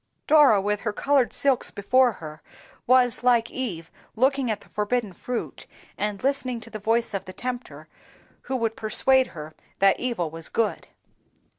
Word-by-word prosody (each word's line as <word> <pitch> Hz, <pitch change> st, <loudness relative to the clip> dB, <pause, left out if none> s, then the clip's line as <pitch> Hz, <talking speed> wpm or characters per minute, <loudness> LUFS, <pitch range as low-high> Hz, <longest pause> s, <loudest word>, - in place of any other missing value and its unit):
Dora, 290 Hz, -9 st, +6 dB
with 205 Hz, +1 st, -1 dB
her 210 Hz, -3 st, -2 dB
colored 275 Hz, +1 st, +2 dB
silks 275 Hz, -3 st, +1 dB
before 245 Hz, +4 st, +2 dB
her, 155 Hz, -4 st, -10 dB, 0.5 s
was, 250 Hz, -1 st, +3 dB
like 240 Hz, -2 st, +2 dB
Eve, 180 Hz, -11 st, -5 dB, 0.2 s
looking 265 Hz, +1 st, +1 dB
at 210 Hz, -2 st, -2 dB
the -, -, -18 dB
forbidden 210 Hz, -1 st, -2 dB
fruit, 245 Hz, +7 st, -6 dB, 0.3 s
and 205 Hz, -1 st, -3 dB
listening 260 Hz, -3 st, -1 dB
to 230 Hz, +1 st, -12 dB
the 215 Hz, -, -6 dB
voice 225 Hz, +2 st, 0 dB
of 195 Hz, -, -3 dB
the 185 Hz, -, -9 dB
Tempter, 250 Hz, +2 st, -6 dB, 0.6 s
who 265 Hz, -, 0 dB
would 230 Hz, -3 st, -1 dB
persuade 260 Hz, +4 st, +2 dB
her 155 Hz, -1 st, -10 dB, 0.2 s
that 195 Hz, 0 st, +3 dB
evil 220 Hz, -11 st, -2 dB
was 165 Hz, 0 st, -2 dB
good. 230 Hz, -2 st, -1 dB
230 Hz, 160 wpm, -25 LUFS, 200-255 Hz, 0.6 s, Dora